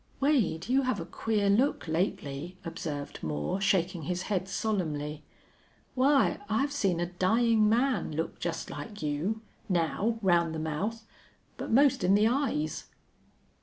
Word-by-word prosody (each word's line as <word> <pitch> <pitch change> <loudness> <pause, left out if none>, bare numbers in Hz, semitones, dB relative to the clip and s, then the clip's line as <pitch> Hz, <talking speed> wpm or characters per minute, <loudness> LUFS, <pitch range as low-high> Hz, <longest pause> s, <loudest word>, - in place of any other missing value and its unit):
"Wade, 245 - +1
you 260 +3 +3
have 255 -6 0
a 165 - -4
queer 210 +1 -1
look, 225 +2 +2
lately," 160 0 -2
observed 150 -3 -5
Moore, 75 - -2
shaking 180 -2 +1
his 180 +4 -2
head 190 -2 -1
solemnly. 155 -9 -2 0.7
"Why, 270 +2 +3
I've 275 +7 +1
seen 195 -12 0
a 175 - +1
dying 215 +5 +3
man 250 0 +1
look 160 +2 -3
just 170 -1 -3
like 210 -6 -7
you 160 +10 -1 0.3
now 190 +6 +1
round 170 -3 +3
the - - -3
mouth 200 +9 -3 0.5
but - - -6
most 270 -2 +4
in 185 +2 +5
the 210 +2 +4
eyes!" 230 - -1
190 Hz, 140 wpm, -29 LUFS, 165-225 Hz, 0.7 s, in